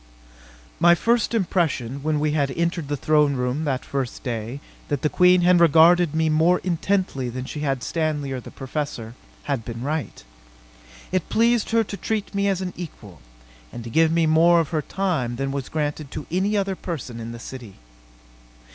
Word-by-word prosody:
My 175 0 +6
first 235 +5 +1
impression, 155 - 0
when 155 0 0
we 150 0 +1
had 145 -2 +1
entered 170 -2 -1
the 145 0 -2
throne 150 0 +3
room 125 +5 -1
that 135 -3 -2
first 135 -3 -4
day, 120 +1 -4 0.3
that 145 -2 -2
the 150 - +2
Queen 180 0 +5
had 175 0 +5
regarded 165 0 +5
me 160 0 +2
more 160 +3 +3
intently 180 -7 -1
than 130 +2 -5
she 150 - -6
had 135 -4 -1
Stanley 155 -4 -1
or 130 - -3
the - - -10
Professor, 135 -4 -5 0.3
had 140 -5 -2
been 115 +1 -6
right. 150 - -3 0.9
It 185 -3 -1
pleased 230 0 +2
her 225 0 +3
to 200 -1 -7
treat 215 -1 -3
me 200 0 +1
as 190 -2 0
an 180 -1 -4
equal, 105 - -10 0.5
and 120 - -7
to 115 - -8
give 160 +4 +4
me 165 0 +2
more 165 +2 +5
of 165 - -1
her 155 -2 0
time 155 -9 -2
than 135 +2 -2
was 140 -1 -4
granted 150 -1 -3
to 145 - -6
any 195 +4 +1
other 195 -1 0
person 135 -10 -6
in 115 0 -6
the 120 - -7
city. 115 -3 -9
155 Hz, 185 wpm, -23 LUFS, 135-175 Hz, 0.9 s, My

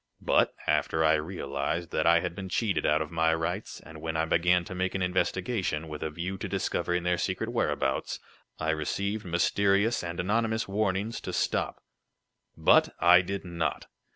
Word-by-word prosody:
But, - - +3
after 80 0 +1
I 80 - +5
realized 80 0 -2
that 80 - +1
I 85 0 +5
had - - -3
been 95 0 -7
cheated 105 0 0
out 75 +1 +3
of 75 - -11
my 80 0 +2
rights, 80 0 -3
and 80 -1 -12
when 80 0 -3
I 80 - +1
began 90 +2 +3
to 95 - -7
make 95 +1 -2
an 95 - 0
investigation, 90 -2 -1
with 75 -1 -7
a 80 - -2
view 90 +5 -5
to 100 - -4
discovering 90 -2 -1
their 90 0 +1
secret - - -2
whereabouts, 65 0 -1 0.4
I 80 0 0
received 100 +7 -2
mysterious 100 +5 +2
and 85 0 -5
anonymous 110 +4 0
warnings 100 +2 -1
to - - -5
stop." - - -1 0.7
"But - - +4
I 90 +1 +7
did 100 +1 -5
not. 85 -2 -2
90 Hz, 175 wpm, -28 LUFS, 80-95 Hz, 0.7 s, I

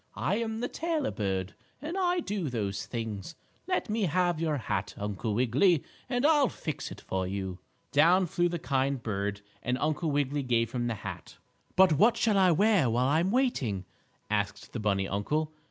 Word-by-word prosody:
"I 200 - 0
am 225 -1 -2
the 245 - 0
tailor 320 -3 -1
bird, 95 -3 -2 0.3
and 305 +6 -5
I 360 -2 +1
do 200 - -2
those 105 -5 -3
things. 115 - -5 0.3
Let 365 -7 0
me 215 -1 0
have 175 -1 +1
your 155 -3 +1
hat, 125 - -3
Uncle 105 +1 -2
Wiggily, 135 - +3 0.3
and 245 +1 +1
I'll 295 -4 +5
fix 155 - -5
it - - -8
for 95 -1 -2
you." 95 -1 -4 0.3
Down 175 +6 +5
flew 175 +1 +1
the 175 - -2
kind 135 -4 0
bird, 100 -1 -2 0.2
and 125 +1 -1
Uncle 155 +3 0
Wiggily 145 0 0
gave 115 -3 +1
him 120 -1 -1
the 115 - -1
hat. 100 - -8 0.4
"But 185 -3 +6
what 215 - +4
shall 215 -4 +3
I 185 -1 +6
wear 190 - +4
while 125 +3 +2
I'm 165 +5 +2
waiting?" 145 - 0 0.4
asked 105 -1 -2
the 120 - -3
bunny 100 -2 +1
uncle. 150 +11 -1
145 Hz, 180 wpm, -29 LUFS, -, 0.4 s, But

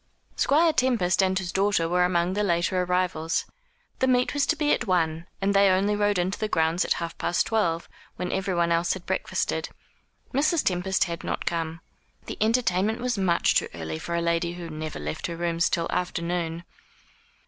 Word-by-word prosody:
Squire 320 +3 +3
Tempest 235 - +2
and 190 0 +2
his 185 -2 -3
daughter 195 -4 +1
were 180 +1 +2
among 180 0 +1
the 205 - 0
later 180 -1 +1
arrivals. 180 -3 0 0.5
The 260 - +2
meet 250 -1 +2
was 285 -1 +1
to 325 - +2
be 300 -1 +2
at 235 - -1
one, 165 -2 0
and 200 +1 +1
they 200 0 +5
only 195 +3 +2
rode 205 -1 +1
into 180 +3 -1
the 215 - 0
grounds 165 -2 +1
at - - +1
half 170 -1 -5
past 175 - +1
twelve, 170 -7 0 0.3
when 180 - -4
everyone 180 -3 0
else 170 +1 +2
had 190 -2 -8
breakfasted. - - -2 0.6
Mrs. 300 +4 +2
Tempest 185 +1 +1
had 170 -2 -5
not - - -3
come. 165 -1 -2 0.4
The - - -7
entertainment 220 -2 +2
was 245 0 -1
much 185 -4 +2
too - - +2
early 80 -1 -5
for 170 - -4
a 170 - 0
lady 170 0 0
who 175 -2 -7
never 155 0 -5
left 75 +1 -4
her 170 - -5
rooms 170 0 +1
till 170 - 0
after 175 -1 -2
noon. 170 -1 -2
180 Hz, 190 wpm, -26 LUFS, 170-205 Hz, 0.6 s, they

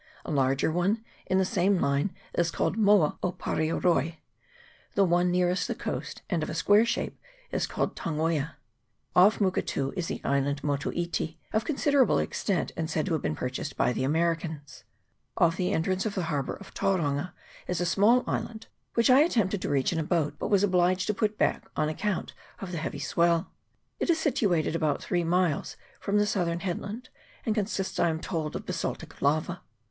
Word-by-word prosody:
A - - -4
larger 135 +1 +2
one 195 +7 0 0.2
in 185 - +2
the 190 - +3
same 195 0 +2
line 140 +5 +1 0.2
is 175 -1 +1
called 170 - -1
Moa 205 -7 +4
Opareoroi. 165 -3 0 0.8
The 200 - +5
one 175 0 +3
nearest 180 +1 +1
the - - -2
coast, - - -5
and 175 -4 0
of 155 - -3
a - - -4
square 205 +7 +4
shape, 235 - -2 0.3
is - - 0
called - - -2
Tangoia. 160 -2 -1 0.6
Off 190 +4 +6
Muketu 180 -8 0
is 180 -3 -2
the - - -3
island 140 +1 0
Motu 145 -1 -1
iti, 170 -2 -2 0.2
of 215 +1 +1
considerable 285 -3 +3
extent, 195 -5 -1
and 160 -1 -2
said 155 -1 0
to 185 - -1
have 155 - 0
been 80 - -1
purchased 130 - -4
by 125 - +2
the 130 - -2
Americans. 160 0 -1 0.5
Off 165 -1 +4
the 180 0 0
entrance 185 +3 0
of 205 - -4
the 185 - -1
harbour 140 -2 -1
of 200 - -13
Tauranga 180 -4 0 0.3
is 180 - -1
a 175 - 0
small 210 +8 +4
island, 220 -1 -3 0.3
which 230 +2 +4
I 260 - +7
attempted 215 - +2
to - - -2
reach 140 +3 +1
in 165 - -1
a - - 0
boat, 155 -3 0
but - - -2
was 200 -2 +4
obliged 185 -1 +3
to 210 - 0
put 215 0 -1
back - - 0
on 155 0 +1
account 195 +4 -2 0.3
of 190 -2 -6
the 170 - -3
heavy 160 - -4
swell. 170 +1 +1 0.5
It - - -1
is 335 - +4
situated 195 - +1
about 155 -3 0
three 175 -1 0
miles 170 -2 0 0.2
from 200 0 0
the 210 - +4
southern 175 -5 -1
headland, 205 +6 -4 0.4
and 220 - +1
con 210 -2 +1
sists, 195 -2 -3
I 170 - +3
am 160 -1 -2
told, 160 -3 -3
of - - -5
basaltic 165 -3 -4
lava. 155 +5 +1
175 Hz, 190 wpm, -28 LUFS, 155-200 Hz, 0.8 s, I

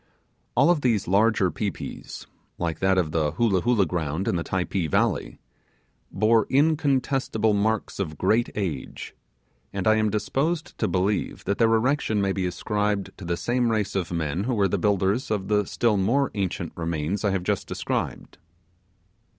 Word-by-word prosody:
All 175 - +5
of 165 -4 +1
these 115 -6 +1
larger 100 -1 +3
pi 105 - -1
pis - - -8 0.3
like 80 -2 -2
that 95 0 +2
of 85 -4 +1
the 75 -2 0
Hoolah 95 -1 +2
Hoolah 115 -3 +3
ground 80 +1 -2
in - - +1
the 85 - -1
Typee 95 -2 -1
valley - - 0 0.7
bore 110 +1 +3
incontestible 135 -6 +2
marks 105 +1 0
of 80 -6 -3
great 110 +8 +2
age; 85 -11 -4 0.6
and 95 -1 -2
I 110 0 +5
am 110 0 +2
disposed 155 - -1
to 110 - +1
believe 95 +3 -1
that 100 +1 -2
their 115 -1 +4
erection 115 -2 +1
may 100 -1 +1
be 95 -2 -1
ascribed 105 +3 -2
to 95 - -8
the 85 0 -1
same 120 +3 0
race 110 -3 0
of 95 -3 -2
men 85 +2 -2
who 125 -1 0
were 100 -2 +3
the 100 +1 -1
builders 100 +6 +1
of 105 -3 -2
the 105 -1 +2
still 115 -4 +1
more 125 +9 +1
ancient 95 -4 -3
remains 85 +3 -2
I 105 - +2
have 95 -2 -1
just 100 +1 -1
described. - - -4
100 Hz, 170 wpm, -25 LUFS, 90-115 Hz, 0.7 s, All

